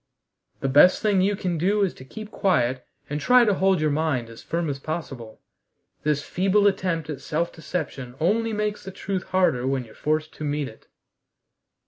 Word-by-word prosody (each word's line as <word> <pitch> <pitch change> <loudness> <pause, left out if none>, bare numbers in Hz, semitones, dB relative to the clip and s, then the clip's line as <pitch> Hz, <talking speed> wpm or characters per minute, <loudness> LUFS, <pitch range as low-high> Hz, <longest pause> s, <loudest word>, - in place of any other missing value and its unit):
"The 135 - 0
best 150 +10 +6
thing 205 -3 +3
you 200 +2 +2
can 180 -4 -2
do 200 +5 +2
is 190 - 0
to - - -12
keep 215 +11 -9
quiet 130 - +1 0.2
and 145 +1 -3
try 250 - +6
to 210 - +3
hold 190 -1 +2
your 155 -1 +1
mind 145 -6 -1
as 115 - -11
firm 170 0 -2
as 140 -2 -3
possible. 135 -8 -6 0.6
This 150 -1 0
feeble 195 +3 +2
attempt 180 -5 +1
at 140 -2 -7
self 170 +3 -2
deception 140 -6 -5
only 225 +7 +1
makes 210 -1 -2
the 190 - -7
truth 190 0 -4
harder 160 -10 +1
when 135 -2 -1
you're 110 - -15
forced 155 +1 -1
to - - -8
meet 145 -1 -1
it." 110 - -14
160 Hz, 185 wpm, -24 LUFS, 140-190 Hz, 0.6 s, best